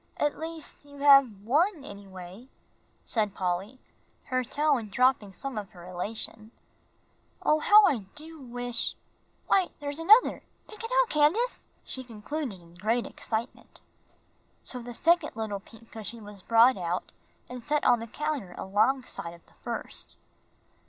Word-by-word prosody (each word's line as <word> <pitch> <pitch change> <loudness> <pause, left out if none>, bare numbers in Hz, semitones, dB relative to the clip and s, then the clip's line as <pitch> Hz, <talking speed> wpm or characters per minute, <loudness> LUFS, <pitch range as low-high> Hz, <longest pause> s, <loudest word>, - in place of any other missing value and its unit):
"At 295 0 0
least 320 -1 -8
you 285 0 -14
have 275 -8 +6
one, 300 - +2
anyway," 195 +2 -10 0.6
said 210 -4 0
Polly, 185 +6 -2 0.5
her 255 -1 +1
tone 280 -3 +1
dropping 245 -2 +2
some 260 +3 -5
of 200 -2 -8
her 175 -2 -12
elation. 215 +4 -4 0.9
"Oh, 305 - +4
how 415 +6 +8
I 290 -9 +3 0.2
do 320 +1 -9
wish 245 -1 -2 0.5
why, 375 -2 +3
there's 290 +1 -3
another 425 +9 +6 0.3
pick 435 +1 -10
it 455 - -4
out, - - +3
Candace," 335 +12 +2
she 260 - -5
concluded 235 - -5
in 170 0 -18
great 220 +7 0
excitement. 230 +2 -5 0.8
So 250 - -5
the 240 0 -7
second 335 -2 +2
little 215 -3 -3
pink 225 +3 -18
cushion 225 0 -7
was 205 -1 -11
brought 230 +4 +5
out 175 0 -3 0.4
and 250 0 -7
set 295 +4 0
on 245 -2 +5
the 230 - -6
counter 280 -8 -3
alongside 205 -3 0
of 170 - -21
the - - -25
first. - - -6
245 Hz, 145 wpm, -28 LUFS, 205-295 Hz, 0.9 s, how